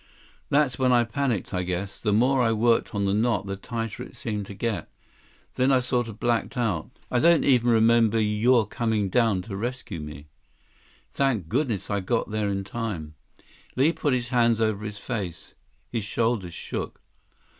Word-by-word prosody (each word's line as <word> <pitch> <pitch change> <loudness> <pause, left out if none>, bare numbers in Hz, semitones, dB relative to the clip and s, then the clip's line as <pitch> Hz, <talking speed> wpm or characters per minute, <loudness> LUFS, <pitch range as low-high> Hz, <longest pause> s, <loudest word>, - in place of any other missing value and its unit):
That's 140 -3 +2
when 130 -1 +3
I 120 -1 +5
panicked, 120 -3 -2
I 90 - 0
guess. 90 +2 -4
The 105 - +1
more 125 +5 +3
I 115 -2 +3
worked 115 0 +2
on 100 0 0
the 100 - +1
knot, 110 -1 +1
the 100 0 -3
tighter 115 +1 -5
it - - -9
seemed 105 -4 -4
to 100 - -8
get. 105 -5 -2 0.6
Then 130 +2 +2
I 130 - +5
sort 125 -1 0
of 110 -1 -9
blacked 120 +2 0
out. 105 -6 -1 0.2
I 125 - +2
don't 170 +4 +5
even 125 -3 +4
remember 115 -1 +4
you're 110 +2 +3
coming 110 -1 -1
down 110 -4 +2
to 100 -1 -7
rescue 115 -4 -4
me." 75 -1 -8 0.9
"Thank 120 - 0
goodness 120 - -1
I 100 - +1
got 110 +3 -1
there 105 -1 0
in 100 0 -2
time!" 95 -8 -5 0.6
Li 140 +6 +4
put 150 -4 0
his 120 -1 -2
hands 115 -2 +3
over 110 -2 0
his 105 -1 -5
face. 100 -7 -5 0.4
His 115 -3 -2
shoulders 105 -4 -1
shook. - - -6
115 Hz, 175 wpm, -25 LUFS, 100-120 Hz, 0.9 s, I